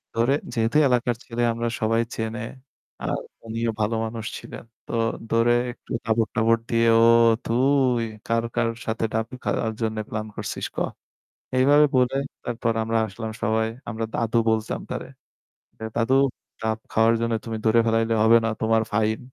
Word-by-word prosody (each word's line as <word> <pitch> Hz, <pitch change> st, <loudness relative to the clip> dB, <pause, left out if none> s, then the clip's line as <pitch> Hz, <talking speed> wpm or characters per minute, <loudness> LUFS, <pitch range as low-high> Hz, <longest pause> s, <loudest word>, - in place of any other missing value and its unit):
ধরে 115 Hz, +4 st, +3 dB, 0.2 s
যেহেতু 115 Hz, +4 st, +1 dB
এলাকার 125 Hz, -1 st, +1 dB
ছেলে 120 Hz, 0 st, -4 dB
আমরা 115 Hz, +1 st, -2 dB
সবাই 115 Hz, +1 st, +2 dB
চেনে। 110 Hz, +2 st, -3 dB, 0.6 s
আর -, -, -1 dB, 0.3 s
উনিও 115 Hz, +1 st, -1 dB
ভালো 110 Hz, +2 st, +1 dB
মানুষ 110 Hz, 0 st, -5 dB
ছিলেন। -, -, -9 dB, 0.2 s
তো -, -, -6 dB, 0.4 s
ধরে 115 Hz, +1 st, +4 dB, 0.2 s
একটু 120 Hz, -, -17 dB
তাবড়-টাবড় 115 Hz, 0 st, +2 dB
দিয়ে, 115 Hz, 0 st, +3 dB
"ও -, -, +6 dB, 0.4 s
তুই 130 Hz, 0 st, +2 dB, 0.2 s
কার 115 Hz, 0 st, +1 dB
কার 115 Hz, -1 st, +2 dB, 0.2 s
সাথে 115 Hz, 0 st, -1 dB
ডাব 110 Hz, 0 st, 0 dB, 0.2 s
খাওয়ার 110 Hz, -1 st, -1 dB
জন্য 110 Hz, -1 st, -1 dB
প্লান 110 Hz, 0 st, -3 dB
করছিস -, -, -4 dB
ক?" -, -, -23 dB, 0.8 s
এইভাবে 145 Hz, +3 st, +6 dB
বলে 125 Hz, +1 st, +3 dB, 0.3 s
তারপর 115 Hz, -1 st, -1 dB
আমরা 115 Hz, +1 st, 0 dB
আসলাম 110 Hz, +2 st, -6 dB
সবাই। 110 Hz, +1 st, +1 dB, 0.2 s
আমরা 115 Hz, -1 st, -3 dB
দাদু 115 Hz, 0 st, 0 dB
বলতাম 110 Hz, -1 st, 0 dB
তারে। -, -, -4 dB, 0.7 s
"এ -, -, -5 dB
দাদু 120 Hz, +2 st, +1 dB, 0.5 s
ডাব 110 Hz, 0 st, 0 dB
খাওয়ার 115 Hz, +1 st, +4 dB
জন্য 115 Hz, 0 st, 0 dB
তুমি 115 Hz, -1 st, -3 dB
ধরে 110 Hz, +1 st, +5 dB
ফেলাইলে 115 Hz, 0 st, +2 dB
হবে 115 Hz, +1 st, +7 dB
না। -, -, +1 dB
তোমার 110 Hz, 0 st, +3 dB
ফাইন।" 110 Hz, +1 st, +1 dB
115 Hz, 155 wpm, -24 LUFS, 110-120 Hz, 0.8 s, হবে